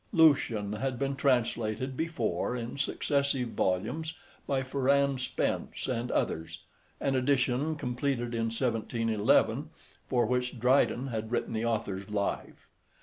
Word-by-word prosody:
Lucian 130 Hz, -, +4 dB
had 130 Hz, +3 st, -2 dB
been 140 Hz, +1 st, -1 dB
translated 125 Hz, -2 st, 0 dB
before 125 Hz, -, -1 dB
in 120 Hz, -1 st, -4 dB
successive 140 Hz, -2 st, 0 dB
volumes 115 Hz, -, -1 dB, 0.3 s
by 135 Hz, -1 st, +1 dB
Ferrand 140 Hz, +1 st, +2 dB
Spence -, -, -2 dB
and 125 Hz, -1 st, -2 dB
others, 80 Hz, +1 st, -2 dB, 0.4 s
an 135 Hz, -, 0 dB
edition, 130 Hz, +3 st, +1 dB
completed 125 Hz, -3 st, -2 dB
in 115 Hz, -1 st, 0 dB
1711, 115 Hz, +3 st, +1 dB, 0.4 s
for 120 Hz, -2 st, +2 dB
which 125 Hz, +1 st, -1 dB
Dryden 130 Hz, +1 st, +3 dB
had 110 Hz, -1 st, -4 dB
written 120 Hz, -, -1 dB
the 110 Hz, +1 st, -1 dB
author's 105 Hz, -4 st, -2 dB
Life. 100 Hz, -1 st, -3 dB
125 Hz, 120 wpm, -30 LUFS, 115-140 Hz, 0.4 s, Lucian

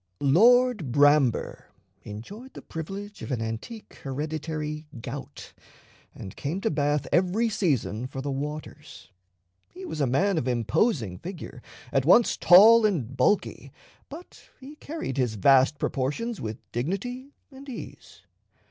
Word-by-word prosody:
Lord 220 Hz, -, +4 dB
Bramber 145 Hz, -2 st, +2 dB, 0.4 s
enjoyed 200 Hz, -, -10 dB
the -, -, -10 dB
privilege 195 Hz, +6 st, -7 dB
of -, -, -7 dB
an 125 Hz, -, -1 dB
antique 115 Hz, -, -7 dB
hereditary 150 Hz, +2 st, -4 dB
gout, -, -, -8 dB, 0.6 s
and 95 Hz, -, -9 dB
came 155 Hz, +7 st, -3 dB
to -, -, 0 dB
Bath 145 Hz, -1 st, 0 dB
every 190 Hz, +6 st, +2 dB
season 130 Hz, -, -1 dB
for 135 Hz, -, -8 dB
the 140 Hz, +1 st, -3 dB
waters. 145 Hz, -6 st, -7 dB, 0.6 s
He 185 Hz, -, -10 dB
was 160 Hz, -3 st, -4 dB
a 140 Hz, -, +2 dB
man 175 Hz, +8 st, +1 dB
of 130 Hz, -, -4 dB
imposing 120 Hz, -, 0 dB
figure, 170 Hz, -8 st, -8 dB, 0.3 s
at 135 Hz, -, +2 dB
once 210 Hz, -, +5 dB
tall 220 Hz, +6 st, +7 dB
and 145 Hz, -, 0 dB
bulky, 135 Hz, +11 st, 0 dB, 0.4 s
but 330 Hz, +5 st, -13 dB
he 275 Hz, +3 st, -11 dB
carried 300 Hz, -, -6 dB
his 125 Hz, -4 st, 0 dB
vast 135 Hz, +7 st, +4 dB
proportions 150 Hz, -, -3 dB
with 110 Hz, 0 st, -5 dB
dignity 245 Hz, -, -4 dB, 0.2 s
and 270 Hz, +1 st, -12 dB
ease. 250 Hz, -, -10 dB
150 Hz, 130 wpm, -26 LUFS, 130-210 Hz, 0.6 s, tall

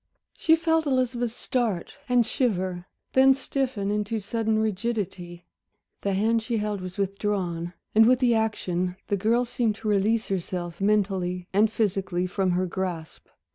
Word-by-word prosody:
She 320 Hz, -, +4 dB
felt 325 Hz, -1 st, +1 dB
Elizabeth 250 Hz, -3 st, +1 dB
start 225 Hz, -5 st, -2 dB
and 245 Hz, -2 st, +4 dB
shiver; 185 Hz, -7 st, -1 dB, 0.3 s
then 265 Hz, 0 st, +6 dB
stiffen 255 Hz, -6 st, -2 dB
into 210 Hz, +1 st, -1 dB
sudden 220 Hz, +1 st, -1 dB
rigidity. 195 Hz, -5 st, -3 dB, 0.6 s
The 200 Hz, -, 0 dB
hand 225 Hz, +3 st, +2 dB
she 230 Hz, +1 st, -2 dB
held 210 Hz, -2 st, -2 dB
was 185 Hz, -1 st, -7 dB
withdrawn, 190 Hz, -4 st, -2 dB, 0.2 s
and 220 Hz, +1 st, +6 dB
with 255 Hz, +1 st, +5 dB
the 245 Hz, -2 st, +3 dB
action 185 Hz, -5 st, -1 dB
the 205 Hz, -, +2 dB
girl 230 Hz, +5 st, +2 dB
seemed 230 Hz, -3 st, 0 dB
to 220 Hz, 0 st, -7 dB
release 215 Hz, +2 st, +1 dB
herself, 175 Hz, -2 st, -3 dB
mentally 190 Hz, -3 st, 0 dB
and 210 Hz, +2 st, +4 dB
physically, 190 Hz, -4 st, 0 dB
from 190 Hz, +1 st, 0 dB
her 185 Hz, -, +1 dB
grasp. 175 Hz, -3 st, -5 dB
210 Hz, 145 wpm, -26 LUFS, 185-230 Hz, 0.6 s, then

